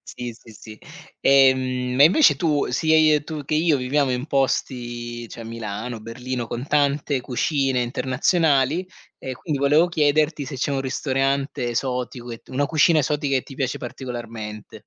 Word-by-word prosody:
Sì, 120 -1 -5
sì, 115 -1 -16
sì. 110 +1 -12 0.4
Ehm, 130 -1 +3
e 145 - +9
invece 270 - +5
tu 150 -5 +1
sia 160 +4 +2
i 155 -1 +5
tu 155 -2 -6
che 155 +2 -2
io 160 -1 +3
viviamo 135 +1 0
in 125 +1 -2
posti, 120 -4 -2
cioè 115 - -9
Milano, 115 +1 -6
Berlino, 120 +2 -5
con 120 +4 -5
tante 145 -1 +1
cucine 135 +1 0
internazionali 140 +5 +1 0.3
e 130 - -6
quindi 145 +2 -4
volevo 150 +5 +4
chiederti 150 -2 +1
se 135 - -6
c'è 135 +2 -1
un 135 - 0
ristorante 135 -1 -1
esotico, 125 0 -3
che 115 - -6
t - - -32
una 140 +2 0
cucina 160 0 +4
esotica 145 -1 0
che 130 - +2
ti 135 - -12
piace 135 -3 -2
particolarmente. 115 -4 -7
135 Hz, 160 wpm, -22 LUFS, 120-145 Hz, 0.4 s, e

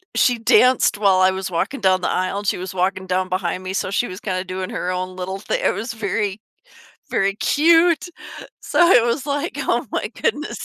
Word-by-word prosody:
she 245 -2 +3
danced 250 0 +4
while 195 -3 +3
I 185 0 +4
was 190 0 -5
walking 180 +11 -2
down 185 -1 +3
the - - -1
aisle, 185 +2 -1
and 205 - -7
she - - +1
was 185 +1 -6
walking 190 +1 -1
down 185 0 0
behind 185 0 -2
me, 185 - -5
so 195 - -2
she 240 +4 0
was 185 +1 -8
kind 185 -3 -2
of 185 - -6
doing 185 0 -4
her 180 - -4
own 185 0 -4
little 190 +1 -4
thi - - -3
it - - +1
was 230 +3 -5
very 205 -2 -2 0.7
very 195 0 0
cute. 330 +6 +3 0.6
So, 345 -1 +3
it 245 -10 +6
was 240 +4 -1
like, 290 +4 -2
"Oh - - -1
my - - -2
goodness." 335 -9 -2
195 Hz, 215 wpm, -20 LUFS, 185-245 Hz, 0.7 s, it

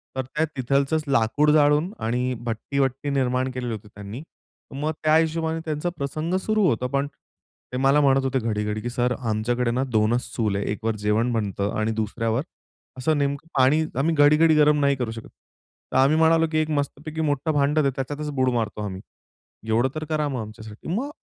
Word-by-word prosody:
तर 130 - 0
त्या 150 +5 -1
तिथलचंच 140 +4 +1
लाकूड 140 +3 +2
जाळून 150 +3 +3
आणि 125 +2 0
भट्टी-वट्टी 135 +4 -1
निर्माण 130 -1 0
केलेली 125 -1 -4
होती 105 -1 -8
त्यांनी. 105 +4 -9 0.6
मग 155 - 0
त्या 155 0 +4
हिशोबाने 160 0 +1
त्यांचा 155 +2 -2
प्रसंग 155 +5 -2
सुरू 215 -2 +2
होतो. 125 -2 0
पण 140 +2 -1
ते 140 -2 -13
मला 135 +3 +4
म्हणत 135 -1 +3
होते 135 0 0
घडी, 110 -3 -1
घडी 105 0 -2
की 120 - -3
सर 125 0 0
आमच्याकडे 115 +1 0
ना 125 +2 0
2च 110 +3 +2
चूल 105 -4 0
आहे, 100 - -2
1 110 +1 -5
वर 115 -1 +1
जेवण 115 +4 +2
बनतं 100 -2 -1
आणि 110 +1 0
2ऱ्यावर 115 +2 -1 0.6
असं 145 +4 +1
नेमकं 140 +2 -1
पाणी. 135 +5 +4 0.2
आम्ही 160 +3 +1
घडी, 145 +1 +6
घडी 160 -1 +5
गरम 150 0 +4
नाही 140 0 +3
करू 125 -4 -3
शकत. 115 0 -9 0.6
तर - - +1
आम्ही 140 +4 +4
म्हणालो 165 0 +4
की 155 - 0
एक 155 0 +1
मस्तपैकी 150 +3 -4
मोठं 150 0 0
भांडं 145 +1 +2
दे. 140 - +3
त्याच्यातच 145 +3 -4
बुड 130 -2 +1
मारतो 110 -2 -2
आम्ही. 95 -2 -6 0.7
एवढं 115 +4 +2
तर 155 - -3
करा 155 -1 0
मग 130 -4 -3
आमच्यासाठी. 110 0 -10
मग 265 +7 -2
135 Hz, 190 wpm, -24 LUFS, 115-150 Hz, 0.7 s, घडी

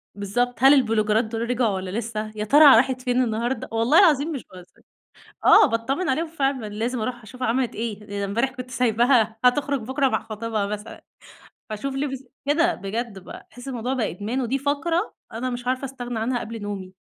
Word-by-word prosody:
بالضبط. 245 +5 -1
هل 270 +2 +9
البلوجرات 220 -4 +2
دول 225 +1 -4
رجعوا 245 -2 +1
والّا 185 0 -4
لسه؟ 215 0 -4
يا 210 - -3
ترى 290 +3 +8
راحت 255 +2 +2
فين 250 0 +1
النهاردة؟ 235 +2 -2
والله 230 +8 +4
العظيم 320 -4 +4
مش 275 - -5
باهزر. 180 -1 -15 0.6
آه، 420 -1 +8
باتطمن 265 +10 -1
عليهم 320 +6 0
فعلًا، 275 -7 -1
لازم 225 +4 -3
أروح 240 0 -4
أشوفها 255 +4 -5
عملت 245 +1 0
إيه؟ 215 -2 -4
أنا 200 - -1
امبارح 235 +7 0
كنت 250 -1 -9
سايباها 235 -2 +2
هتخرج 275 0 +2
بكرة 265 +3 0
مع - - -1
خطيبها 220 -1 -3
مثلًا، 210 0 -7 0.7
فاشوف 265 +6 -4
لبس 270 -1 -3 0.2
كده 335 +4 +2
بجد 210 +1 -5
ب 185 - -11
تحس 245 +3 -12
الموضوع 250 0 -3
بقى 235 -5 -1
إدمان، 215 +8 -3
ودي 255 +2 -1
فقرة 295 +7 -1 0.2
أنا 240 +3 -3
مش 245 0 -6
عارفة 255 +2 -1
أستغنى 245 -3 -5
عنها 245 +2 -1
قبل 230 -1 -7
نومي. 195 -2 -6
245 Hz, 185 wpm, -23 LUFS, 220-270 Hz, 0.7 s, هل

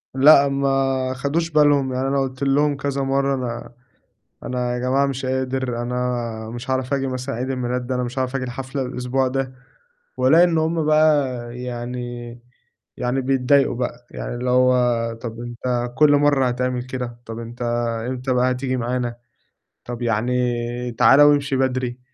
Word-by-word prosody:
لأ، 140 +1 +7
ما 135 -1 0
خَدوش 145 +6 -1
بالهم، 145 -3 +3
يعني 130 +1 -1
أنا 140 0 +1
قُلت 130 +1 -4
لهُم 145 +1 +2
كذا 140 -1 -2
مرّة: 135 +1 +1
"أنا 120 -1 -5 0.7
أنا 125 -1 -2
يا - - -2
جماعة 130 +3 +2
مش 135 -1 -3
قادر، 130 -2 -2
أنا 120 -2 -3
مش 120 +2 -6
هاعرف 130 +1 0
آجي 135 -1 -1
مثلًا 130 +1 -4
عيد 130 +3 -3
الميلاد 125 -1 -2
ده، 130 - -2
أنا 125 - -1
مش 125 +2 -4
هاعرف 130 +1 -1
آجي 130 - -3
الحفلة 130 +2 -4
الأسبوع 130 +1 -1
ده." 130 0 -2 0.7
وألاقي 135 +7 +5
إن 170 -2 +2
هُم 160 0 0
بقى 155 -2 +4 0.3
يعني 125 0 -5 1.0
يعني 125 +2 -1
بيتضايقوا 135 0 +2
بقى، 120 0 -4
يعني - - -5
اللي 125 +1 -2
هو 125 -2 +2
طب 115 -1 -6
أنت 120 0 -3
كُل 150 -1 +6
مرّة 145 -3 +3
هتعمل 125 0 -1
كده؟ 125 -2 -6
طب 115 0 -7
أنت 120 +1 -9 0.5
إمتى 130 0 -2
بقى 125 +1 +2
هتيجي 130 0 -2
معانا؟ 120 0 -2 0.7
طب 120 0 -6
يعني 120 +2 0 0.5
تعالى 125 +5 +6
وامشي 145 -2 +3
بدري. 130 -1 -1
130 Hz, 160 wpm, -21 LUFS, 125-135 Hz, 1.0 s, لأ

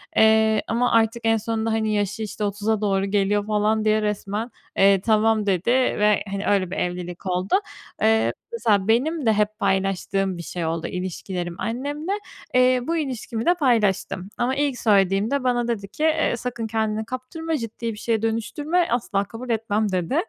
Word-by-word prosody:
Eee, 220 0 +4
ama 240 +2 +1
artık 230 +1 +2
en 225 0 +4
sonunda 225 +1 -2
hani 220 -1 0
yaşı 205 +1 -1
işte 210 0 -5
30'a 205 +1 -1
doğru 195 -1 +1
geliyor 205 +1 +1
falan 215 +1 +1
diye 215 0 +3
resmen, 210 +2 -3 0.3
eee, 195 -1 +5
tamam 220 0 +2
dedi 190 0 0
ve 210 -5 +2
hani 200 +1 -3
öyle 190 -3 +1
bir - - -4
evlilik 180 0 -4
oldu. 185 - 0 0.5
Iıı, 220 0 +3 0.2
mesela 210 - +1
benim 280 +7 +1
de 220 - +4
hep 210 0 0
paylaştığım 195 -1 0
bir 170 - -6
şey 170 -1 -4
oldu, 165 0 -2
ilişkilerim 180 -1 -4
annemle. 285 - -3 0.4
Eee, 255 0 +4
bu 335 - 0
ilişkimi 245 -6 -3
de 350 - +5
paylaştım 210 - +1
ama 250 +2 0
ilk 280 -3 0
söylediğimde 205 +5 +2
bana 245 -1 +1
dedi 205 -4 -2
ki, 305 +9 -2 0.2
ııı, 240 - -1
sakın 240 -2 -4
kendini 220 0 -1
kaptırma, 305 +6 -4
ciddi 230 -1 -4
bir - - -11
şeye 225 0 -1
dönüştürme, 290 +10 0
asla 215 -5 0
kabul 235 +4 -9
etmem 220 -2 0
dedi. 185 - -1
220 Hz, 170 wpm, -23 LUFS, 200-240 Hz, 0.5 s, eee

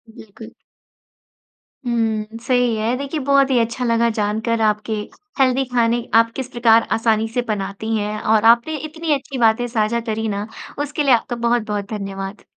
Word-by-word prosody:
बिल्कुल। 220 +1 -12 1.3
हुँ, 225 -2 -1
सही 245 -1 +1
है। 220 +3 0
देखिए, 280 +3 -4
बहुत 275 0 +3
ही 250 - +4
अच्छा 235 +2 -1
लगा 235 0 +2
जानकर 220 +1 -1
आपके 215 +1 0 0.5
हेल्दी 265 0 +3
खाने, 235 0 +2
आप 230 0 +5
किस 265 -2 -4
प्रकार 230 -1 +4
आसानी 225 -1 +1
से 245 - +1
बनाती 210 +1 -3
हैं 210 0 -3
और 220 0 +2
आपने 240 +7 -4
इतनी 310 +2 -3
अच्छी 275 -1 -4
बातें 230 0 +3
साझा 230 0 0
करी 220 +1 -2
ना, 205 0 -3 0.4
उसके 295 +1 -2
लिए 275 -3 +4
आपका 240 +1 -3
बहुत-बहुत 220 -4 -1
धन्यवाद। 195 -1 -6
230 Hz, 160 wpm, -20 LUFS, 215-245 Hz, 1.3 s, आप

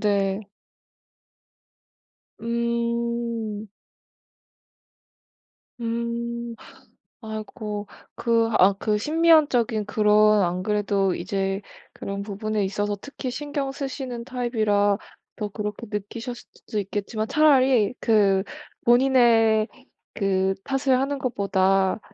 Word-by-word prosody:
네. 200 -1 +1 2.0
음. 235 -1 -2 2.1
음. 235 0 -3 0.7
아이고. 215 -1 -6 0.3
그 230 -1 +2
아 195 +2 +6
그 210 -1 0
심미안적인 295 -7 +3
그런 210 0 +4
안 180 +1 -1
그래도 200 -2 +1
이제 195 +2 -2 0.3
그런 200 0 -5
부분에 210 +1 -2
있어서 205 +1 -1
특히 275 +1 -6
신경 285 0 -3
쓰시는 265 -4 -5
타입이라 215 -5 +1 0.4
더 210 - -3
그렇게 210 +2 -5
느끼셨을 225 +4 -5 0.2
수도 215 - -6
있겠지만 205 +2 -3
차라리 260 -7 +4
그 200 -4 +3 0.4
본인의 235 -3 +4 0.5
그 190 -2 +1
탓을 270 -1 +1
하는 275 +1 -1
것보다 195 -4 +1
220 Hz, 190 characters per minute, -24 LUFS, 205-240 Hz, 2.1 s, 아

